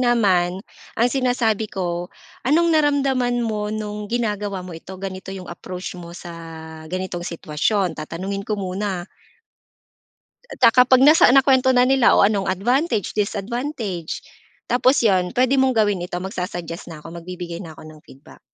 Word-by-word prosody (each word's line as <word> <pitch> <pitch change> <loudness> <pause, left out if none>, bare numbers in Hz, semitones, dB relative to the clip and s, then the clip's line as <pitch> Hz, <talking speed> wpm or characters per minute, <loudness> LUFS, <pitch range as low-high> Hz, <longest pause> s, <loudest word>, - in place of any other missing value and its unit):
naman, 195 -6 +2 0.3
ang 235 +2 +3
sinasabi 240 -5 +1
ko, 175 -2 -3 0.3
anong 330 +6 +3
naramdaman 270 -5 +2
mo, 210 -2 -2
no'ng 210 -1 -5
ginagawa 210 -5 -2
mo 180 - -8
ito, 175 +3 -9
ganito 190 0 -7
yung 190 -1 -6
approach 180 +1 -7
mo 175 -1 -10
sa 175 -1 -9 0.6
ganitong 185 0 -4
sitwasyon? 175 +3 -1
Tatanungin 185 +6 -4
ko 215 - 0
muna. 190 -1 -3 1.5
At, - - -11
ah, - - +2
kapag 255 0 +6
nasa 300 +2 +7
nakwento 265 -1 +5
na 250 -1 +5
nila, 265 -3 +5
"O, - - +6
anong 200 -1 +1
advantage, 230 - 0
disadvantage." 210 - -3 0.5
Tapos 250 +3 +3
'yon, 185 -4 +2
"Puwede 255 +2 +2
mong 260 -2 +2
gawin 205 -5 +2
ito," 175 - -5
magsa-suggest 180 -3 -5
na 160 -2 -9
'ko. 165 +2 -10
Magbibigay 170 0 -7
na 165 - -9
ako - - -12
ng 155 -1 -13
feedback. 135 - -16
205 Hz, 150 wpm, -21 LUFS, 180-245 Hz, 1.5 s, nasa